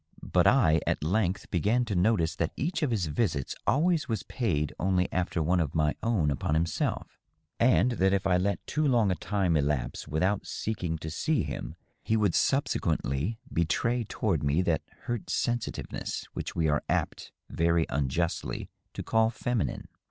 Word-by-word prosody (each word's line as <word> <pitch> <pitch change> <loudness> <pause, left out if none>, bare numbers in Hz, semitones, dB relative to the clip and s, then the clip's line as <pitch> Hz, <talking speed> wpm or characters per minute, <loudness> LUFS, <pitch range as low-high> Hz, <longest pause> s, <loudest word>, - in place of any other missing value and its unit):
But - - +3
I 80 0 +4
at - - 0
length 95 +3 0
began 110 +8 +2
to 110 - -3
notice 90 -3 +2
that 85 - -1
each 170 +5 -2
of 150 - +1
his 105 -7 0
visits 75 - -1
always 155 +3 +2
was 110 -3 -1
paid 75 - -1
only 90 0 +2
after 90 -2 0
one 90 +3 +2
of 80 -5 -1
my 75 -1 +2
own 100 -11 +1
upon 70 +2 -1
himself, 80 0 -1 0.4
and 125 +1 +4
that 95 -4 +2
if 100 0 0
I 90 -2 +3
let 100 +2 -1
too 155 - -1
long 115 -7 +3
a - - +1
time 95 0 0
elapse 70 -3 -1
without 95 +6 0
seeking 90 -7 -3
to 80 0 -6
see 145 - 0
him - - -5 0.3
he 110 - +1
would 105 -5 +2
subsequently 70 - 0 0.2
betray 115 +9 +1
toward 100 -6 -1
me 70 +5 +2
that 85 -3 +1 0.2
hurt 120 -3 -4
sensitiveness 120 -1 -2
which - - -5
we 80 -1 +1
are 75 0 +2
apt - - -1 0.2
very 85 0 +2
unjustly 75 +5 -2 0.2
to - - -5
call 110 0 +3
feminine. 120 -1 -2
90 Hz, 165 wpm, -28 LUFS, 80-110 Hz, 0.4 s, I